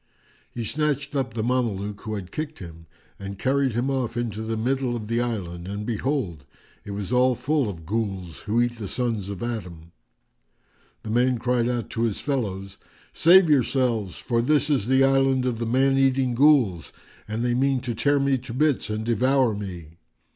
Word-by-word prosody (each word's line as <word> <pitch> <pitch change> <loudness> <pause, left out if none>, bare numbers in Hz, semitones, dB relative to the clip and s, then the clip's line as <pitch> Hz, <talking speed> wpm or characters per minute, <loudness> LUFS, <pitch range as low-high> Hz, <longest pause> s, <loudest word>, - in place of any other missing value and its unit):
[FN#402] - - -35
He 120 - -3
snatched 145 +1 -1
up 130 -5 -2
the 110 - -1
Mameluke 105 -5 -1
who 110 -1 -4
had 90 -3 -7
kicked 155 0 -5
him 80 -2 -11 0.3
and 100 0 -6
carried 135 +2 +1
him 125 +4 0
off 125 -3 -2
into 110 -3 -3
the 110 0 -3
middle 125 +1 0
of 110 -3 -5
the 115 +2 0
island, 90 -7 -4
and 100 +2 -4
behold, 115 - -2 0.4
it - - -10
was 100 +3 -4
all 125 0 +4
full 145 -2 0
of 80 -5 -8
Ghuls 95 -4 -3
who 110 +3 +1
eat 120 -1 0
the 105 - -4
sons 115 -4 -2
of 100 +1 -5
Adam. 90 -9 -6 1.1
The 110 - -5
man 125 +2 +2
cried 120 0 0
out 120 -2 -3
to 115 - -3
his 115 -3 0
fellows, 100 -8 -3 0.4
"Save 180 +2 +6
yourselves, 125 - +1
for 115 -2 0
this 150 +4 +2
is 130 -7 +1
the 130 +1 +4
island 135 -1 +3
of 120 -3 -1
the 115 - -2
man 135 +3 +3
eating 135 -2 +2
Ghuls, 120 - +3 0.4
and 110 +3 -2
they 120 - +1
mean 135 +1 +2
to 120 -1 -3
tear 145 +6 +2
me 135 -1 +2
to 120 -1 -8
bits 150 -3 +1
and 110 +1 -3
devour 125 +1 +2
me." 90 -5 -8
120 Hz, 190 wpm, -24 LUFS, 105-130 Hz, 1.1 s, Save